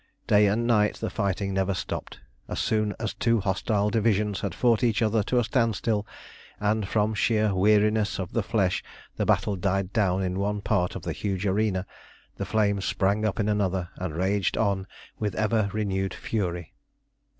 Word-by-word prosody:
Day 105 Hz, 0 st, +5 dB
and 110 Hz, +4 st, +1 dB
night 105 Hz, -3 st, +3 dB
the -, -, -4 dB
fighting 100 Hz, -1 st, -1 dB
never 95 Hz, 0 st, 0 dB
stopped. -, -, -5 dB, 0.3 s
As -, -, -5 dB
soon 105 Hz, -2 st, 0 dB
as 115 Hz, -2 st, -2 dB
two 115 Hz, -1 st, +1 dB
hostile 100 Hz, +1 st, 0 dB
divisions 105 Hz, -3 st, +1 dB
had 95 Hz, -4 st, -3 dB
fought 120 Hz, -1 st, +2 dB
each 115 Hz, -1 st, +2 dB
other 110 Hz, 0 st, +2 dB
to 125 Hz, +5 st, 0 dB
a 120 Hz, -, +4 dB
standstill, 110 Hz, -3 st, 0 dB, 0.5 s
and 105 Hz, 0 st, 0 dB
from 105 Hz, +1 st, +1 dB
sheer 110 Hz, -1 st, +2 dB
weariness 105 Hz, +1 st, +3 dB
of 95 Hz, -1 st, -4 dB
the 115 Hz, -, +1 dB
flesh 95 Hz, -3 st, 0 dB, 0.3 s
the -, -, 0 dB
battle 105 Hz, -, +2 dB
died 95 Hz, +1 st, -1 dB
down 95 Hz, -4 st, +1 dB
in 90 Hz, +1 st, -2 dB
one 105 Hz, +1 st, -1 dB
part 90 Hz, -4 st, 0 dB
of -, -, -6 dB
the -, -, -3 dB
huge 100 Hz, -1 st, -3 dB
arena, 100 Hz, -1 st, +1 dB, 0.5 s
the -, -, -3 dB
flame 100 Hz, -2 st, +1 dB
sprang 100 Hz, +3 st, 0 dB
up 110 Hz, +1 st, -1 dB
in 105 Hz, -, +1 dB
another, 95 Hz, -4 st, 0 dB
and 90 Hz, -4 st, -5 dB
raged 95 Hz, +2 st, 0 dB
on 100 Hz, -3 st, 0 dB, 0.3 s
with 105 Hz, -3 st, -2 dB
ever 110 Hz, -1 st, +1 dB
renewed 95 Hz, -2 st, -1 dB
fury. 90 Hz, -6 st, -3 dB
105 Hz, 175 wpm, -26 LUFS, 95-110 Hz, 0.5 s, Day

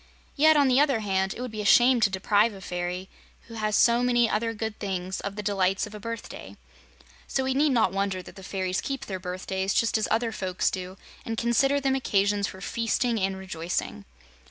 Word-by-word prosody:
Yet, 310 Hz, +1 st, +5 dB
on 285 Hz, -2 st, +4 dB
the 255 Hz, +1 st, +4 dB
other 275 Hz, -6 st, +2 dB
hand, 190 Hz, -2 st, 0 dB
it -, -, -6 dB
would 250 Hz, -2 st, -5 dB
be 215 Hz, -1 st, -4 dB
a -, -, -5 dB
shame 245 Hz, +4 st, +6 dB
to 205 Hz, -, +4 dB
deprive 205 Hz, +3 st, +2 dB
a 195 Hz, -, -11 dB
fairy, 180 Hz, +1 st, -4 dB, 0.3 s
who 230 Hz, -, -14 dB
has 215 Hz, -1 st, -1 dB
so 235 Hz, +2 st, +4 dB
many 240 Hz, -1 st, +3 dB
other 225 Hz, +1 st, -1 dB
good 220 Hz, -1 st, -5 dB
things, 190 Hz, -2 st, -3 dB
of 200 Hz, 0 st, -5 dB
the 210 Hz, -, -5 dB
delights 195 Hz, -1 st, +1 dB
of 210 Hz, -, -11 dB
a 210 Hz, -, -8 dB
birthday. 230 Hz, +1 st, -7 dB, 0.7 s
So 265 Hz, -, -1 dB
we 260 Hz, 0 st, 0 dB
need 295 Hz, +3 st, +3 dB
not 225 Hz, -7 st, +3 dB
wonder 195 Hz, -1 st, -2 dB
that -, -, -13 dB
the 195 Hz, -, -11 dB
fairies 185 Hz, -1 st, -2 dB
keep 275 Hz, -2 st, -4 dB
their 190 Hz, -2 st, -5 dB
birthdays 190 Hz, +1 st, -3 dB
just 230 Hz, -1 st, +2 dB
as 215 Hz, -, 0 dB
other 230 Hz, +1 st, +1 dB
folks 185 Hz, -4 st, -1 dB
do, 185 Hz, 0 st, -6 dB, 0.3 s
and 225 Hz, -1 st, -4 dB
consider 270 Hz, +5 st, +2 dB
them 270 Hz, -1 st, +1 dB
occasions 205 Hz, -5 st, +1 dB
for 190 Hz, -, -10 dB
feasting 230 Hz, +2 st, 0 dB
and 190 Hz, 0 st, -1 dB
rejoicing. 170 Hz, -, -4 dB
210 Hz, 210 wpm, -26 LUFS, 190-235 Hz, 0.7 s, shame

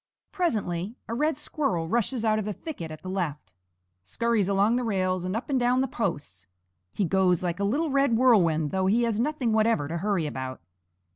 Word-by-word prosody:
Presently 215 Hz, -, -1 dB
a 230 Hz, -, -4 dB
red 300 Hz, +4 st, 0 dB
squirrel 195 Hz, -, -2 dB
rushes 235 Hz, +3 st, 0 dB
out 215 Hz, 0 st, +2 dB
of 210 Hz, -, -3 dB
the 210 Hz, -, -2 dB
thicket 190 Hz, -, -7 dB
at 155 Hz, -1 st, -10 dB
the -, -, -7 dB
left, 155 Hz, -, -3 dB, 0.5 s
scurries 210 Hz, -, 0 dB
along 200 Hz, +4 st, +3 dB
the 250 Hz, -, 0 dB
rails 185 Hz, -4 st, 0 dB
and 185 Hz, +2 st, -2 dB
up 230 Hz, -, -3 dB
and 270 Hz, -3 st, +1 dB
down 250 Hz, +1 st, +2 dB
the 265 Hz, -, 0 dB
posts. 145 Hz, -, -4 dB, 0.4 s
He 200 Hz, -, -1 dB
goes 185 Hz, -1 st, +2 dB
like 175 Hz, +1 st, -2 dB
a -, -, 0 dB
little 285 Hz, +10 st, 0 dB
red 275 Hz, -4 st, +3 dB
whirlwind, 170 Hz, -, +3 dB
though 190 Hz, 0 st, 0 dB
he 230 Hz, +5 st, +3 dB
has 225 Hz, -2 st, 0 dB
nothing 255 Hz, -3 st, 0 dB
whatever 220 Hz, -9 st, +2 dB
to 170 Hz, +3 st, -3 dB
hurry 195 Hz, -3 st, 0 dB
about. 130 Hz, -3 st, -5 dB
205 Hz, 200 wpm, -26 LUFS, 175-240 Hz, 0.5 s, along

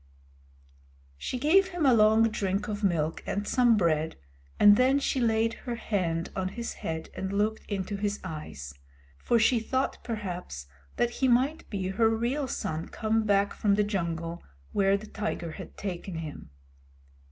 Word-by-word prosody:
She 160 Hz, -, -4 dB
gave 340 Hz, +9 st, +4 dB
him 350 Hz, -5 st, -2 dB
a 260 Hz, -, +6 dB
long 220 Hz, 0 st, +5 dB
drink 200 Hz, -1 st, -1 dB
of 210 Hz, 0 st, -4 dB
milk 165 Hz, -4 st, 0 dB
and 205 Hz, +1 st, -2 dB
some 240 Hz, -3 st, +4 dB
bread, 160 Hz, -4 st, +1 dB, 0.4 s
and 205 Hz, 0 st, +8 dB
then 260 Hz, +4 st, +4 dB
she 275 Hz, -1 st, 0 dB
laid 225 Hz, 0 st, +2 dB, 0.2 s
her 240 Hz, -, -1 dB
hand 175 Hz, -7 st, -2 dB
on 190 Hz, -1 st, -1 dB
his 235 Hz, +5 st, -5 dB
head 160 Hz, 0 st, -4 dB
and 190 Hz, 0 st, -3 dB
looked 210 Hz, +2 st, -1 dB
into 200 Hz, 0 st, -3 dB
his 205 Hz, 0 st, -2 dB
eyes; 150 Hz, -, -7 dB, 0.5 s
for 235 Hz, -, +2 dB
she 230 Hz, +2 st, +4 dB
thought 260 Hz, +4 st, -2 dB
perhaps 180 Hz, -, -5 dB, 0.3 s
that 240 Hz, 0 st, +1 dB
he 260 Hz, +2 st, 0 dB
might 260 Hz, +6 st, +2 dB
be 190 Hz, -3 st, -2 dB
her 220 Hz, +3 st, +3 dB
real 240 Hz, +6 st, -1 dB
son 165 Hz, -9 st, -3 dB
come 220 Hz, 0 st, 0 dB
back 200 Hz, -1 st, +2 dB
from 200 Hz, -2 st, +2 dB
the 210 Hz, -, +3 dB
jungle 170 Hz, -4 st, -3 dB, 0.3 s
where 195 Hz, 0 st, +3 dB
the 210 Hz, -, -10 dB
tiger 210 Hz, -6 st, -4 dB
had -, -, -10 dB
taken 185 Hz, -2 st, -5 dB
him. 155 Hz, -, -7 dB
205 Hz, 165 wpm, -28 LUFS, 180-230 Hz, 0.5 s, and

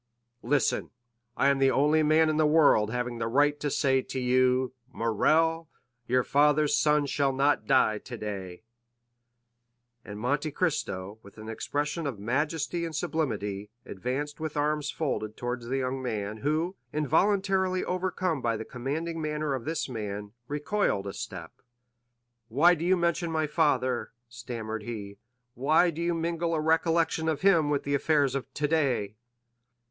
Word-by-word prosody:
"Listen; 135 Hz, +2 st, +1 dB, 0.5 s
I 140 Hz, -, +4 dB
am 140 Hz, -1 st, +2 dB
the 135 Hz, 0 st, +4 dB
only 150 Hz, +4 st, +3 dB
man 155 Hz, +1 st, +4 dB
in 155 Hz, -1 st, 0 dB
the 155 Hz, -1 st, +4 dB
world 150 Hz, -9 st, +4 dB
having 120 Hz, 0 st, -3 dB
the 115 Hz, -, -1 dB
right 145 Hz, +4 st, +2 dB
to 145 Hz, -, -1 dB
say 135 Hz, -2 st, +2 dB
to 130 Hz, -, -5 dB
you, 130 Hz, 0 st, +2 dB, 0.2 s
'Morrel, 160 Hz, +9 st, +1 dB, 0.4 s
your 125 Hz, +1 st, +2 dB
father's 150 Hz, +2 st, +3 dB
son 150 Hz, -1 st, +3 dB
shall 140 Hz, -1 st, +1 dB
not 140 Hz, +2 st, +1 dB
die 120 Hz, -5 st, +3 dB
today;'" 105 Hz, -6 st, -7 dB, 1.4 s
and 105 Hz, 0 st, -8 dB
Monte 145 Hz, +6 st, 0 dB
Cristo, 105 Hz, -, -2 dB
with 100 Hz, 0 st, -16 dB
an 110 Hz, 0 st, -9 dB
expression 150 Hz, +7 st, -2 dB
of 130 Hz, -6 st, -4 dB
majesty 150 Hz, -, -1 dB
and 165 Hz, -2 st, -4 dB
sublimity, 105 Hz, -, -2 dB, 0.2 s
advanced 130 Hz, -, -4 dB
with 155 Hz, -1 st, -4 dB
arms 150 Hz, 0 st, 0 dB
folded 110 Hz, -10 st, -3 dB
toward 120 Hz, 0 st, -3 dB
the 125 Hz, +3 st, -3 dB
young 130 Hz, 0 st, -2 dB
man, 110 Hz, -4 st, -3 dB
who, 155 Hz, -, -1 dB, 0.2 s
involuntarily 190 Hz, +5 st, +1 dB
overcome 180 Hz, -4 st, -1 dB
by 115 Hz, -2 st, 0 dB
the 110 Hz, -, -6 dB
commanding 160 Hz, +7 st, -4 dB
manner 150 Hz, -1 st, -2 dB
of 130 Hz, -3 st, -4 dB
this 160 Hz, 0 st, -2 dB
man, 105 Hz, -4 st, -5 dB, 0.2 s
recoiled 150 Hz, -, -1 dB
a 100 Hz, -, -5 dB
step. -, -, -8 dB, 0.9 s
"Why 150 Hz, +10 st, +5 dB
do 165 Hz, -1 st, -3 dB
you 185 Hz, +2 st, +3 dB
mention 170 Hz, 0 st, 0 dB
my 160 Hz, -1 st, +1 dB
father?" 145 Hz, -7 st, 0 dB
stammered 115 Hz, -2 st, -6 dB
he; 105 Hz, -3 st, -7 dB, 0.3 s
"why 155 Hz, +8 st, +3 dB
do 165 Hz, +1 st, -6 dB
you 170 Hz, 0 st, 0 dB
mingle 165 Hz, 0 st, -1 dB
a -, -, 0 dB
recollection 160 Hz, 0 st, +1 dB
of 155 Hz, -3 st, -2 dB
him 170 Hz, -6 st, +4 dB
with 145 Hz, -1 st, 0 dB
the 140 Hz, -, -2 dB
affairs 140 Hz, -1 st, +2 dB
of 135 Hz, -2 st, -4 dB
today?" 140 Hz, -9 st, 0 dB
145 Hz, 155 wpm, -28 LUFS, 120-160 Hz, 1.4 s, Why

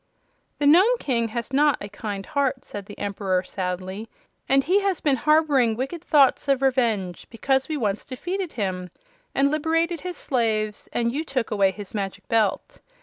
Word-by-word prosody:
"The 290 Hz, -, -1 dB
Nome 375 Hz, +12 st, +6 dB
King 235 Hz, -4 st, 0 dB
has 235 Hz, +3 st, -5 dB
not 290 Hz, 0 st, +4 dB
a 205 Hz, -, -6 dB
kind 200 Hz, -1 st, -6 dB
heart," 275 Hz, -2 st, -1 dB
said 200 Hz, -1 st, -7 dB
the 205 Hz, -, -10 dB
Emperor, 195 Hz, -2 st, -1 dB
sadly, 185 Hz, +3 st, -4 dB, 0.4 s
"and 270 Hz, 0 st, +4 dB
he 375 Hz, +7 st, +3 dB
has 390 Hz, -4 st, 0 dB
been 285 Hz, -3 st, +2 dB
harboring 290 Hz, -5 st, +3 dB
wicked 270 Hz, +8 st, -4 dB
thoughts 285 Hz, -4 st, +4 dB
of 275 Hz, -1 st, +2 dB
revenge, 225 Hz, -9 st, 0 dB
because 265 Hz, +4 st, 0 dB
we 310 Hz, -, -1 dB
once 210 Hz, -5 st, -1 dB
defeated 355 Hz, +7 st, -4 dB
him 185 Hz, -4 st, -3 dB, 0.5 s
and 280 Hz, +1 st, +3 dB
liberated 325 Hz, +2 st, 0 dB
his 360 Hz, -1 st, -5 dB
slaves 215 Hz, -4 st, -1 dB
and 235 Hz, 0 st, 0 dB
you 295 Hz, +5 st, -2 dB
took 260 Hz, -7 st, -2 dB
away 200 Hz, -2 st, +3 dB
his 200 Hz, +1 st, -8 dB
Magic 195 Hz, -3 st, -4 dB
Belt. 225 Hz, -, 0 dB
255 Hz, 170 wpm, -24 LUFS, 205-295 Hz, 0.5 s, Nome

